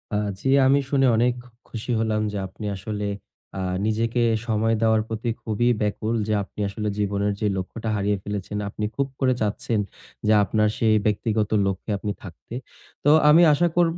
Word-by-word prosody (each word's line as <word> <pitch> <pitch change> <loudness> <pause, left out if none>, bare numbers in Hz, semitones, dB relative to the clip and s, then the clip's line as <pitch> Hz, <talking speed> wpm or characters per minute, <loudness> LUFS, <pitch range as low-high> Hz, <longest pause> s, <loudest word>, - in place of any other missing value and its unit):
আ - - +2 0.2
জি, 135 - -4 0.2
আমি 140 +1 +5
শুনে 135 -1 +3
অনেক 120 +2 +3
খু 125 - -18 0.2
খুশি 115 +2 -5
হলাম 110 -1 0
যে 105 - -4
আপনি 105 +3 -9
আসলে, 105 +2 -4 0.5
আ - - -2 0.2
নিজেকে 115 +2 0 0.3
সময় 110 0 +1
দেওয়ার 110 -1 +3
প্রতি 115 +1 -3
খুবই 115 +2 0
ব্যাকুল, 105 +2 -1
যে 110 - +1
আপনি 100 - -13
আসলে 105 +1 -4
জীবনের 100 0 0
যে 105 - +1
লক্ষ্যটা 110 +4 -4
হারিয়ে 100 0 0
ফেলেছেন, 105 0 -4
আপনি 105 +1 -4
খুব 140 +2 0
করে 130 -2 +3
চাচ্ছেন 110 +2 -1 0.5
যে 110 - +5
আপনার 105 +2 +2
সেই 110 -1 +3
ব্যক্তিগত 105 0 0 0.2
লক্ষ্যে 95 +3 -3
আপনি 105 +1 -3
থাকতে। 90 +4 -11 0.5
তো 145 - +5 0.2
আমি 160 +3 +7
আশা 175 +4 +3
করব 170 -1 +3
110 Hz, 175 wpm, -24 LUFS, 105-120 Hz, 0.5 s, আমি